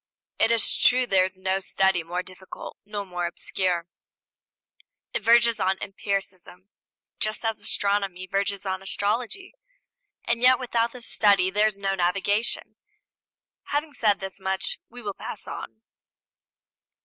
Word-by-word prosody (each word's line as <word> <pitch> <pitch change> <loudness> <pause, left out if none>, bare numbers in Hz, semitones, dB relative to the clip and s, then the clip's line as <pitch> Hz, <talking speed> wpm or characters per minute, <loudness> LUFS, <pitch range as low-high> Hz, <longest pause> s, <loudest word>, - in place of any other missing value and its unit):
It 225 - +4
is 230 -2 +2
true 255 0 +4
there 190 -5 +4
is 185 0 -6
no 190 +1 0
study 190 -1 +2
more 175 +2 -3
difficult 185 0 -10
nor 205 -1 -4
more 175 -2 -2
obscure; 175 0 -1 1.3
it - - 0
verges 235 0 +5
on 190 -1 +2
empiricism, 195 -2 -4 0.5
just 215 +2 -1
as 225 -1 0
astronomy 200 -2 0
verges 200 +1 -1
on 190 -1 -2
astrology; 230 - -2 0.7
and 235 0 0
yet 255 +1 +7
without 235 -2 0
this 245 -1 -7
study 200 -3 +4
there 210 +2 +4
is 210 -2 -3
no 195 -1 0
navigation. 200 +4 0 0.9
Having 295 +1 -2
said 210 -6 +2
this 195 0 -7
much 190 0 -2
we 245 +1 -11
will 205 -1 -3
pass - - -7
on. 220 - -7
200 Hz, 135 wpm, -26 LUFS, 190-225 Hz, 1.3 s, yet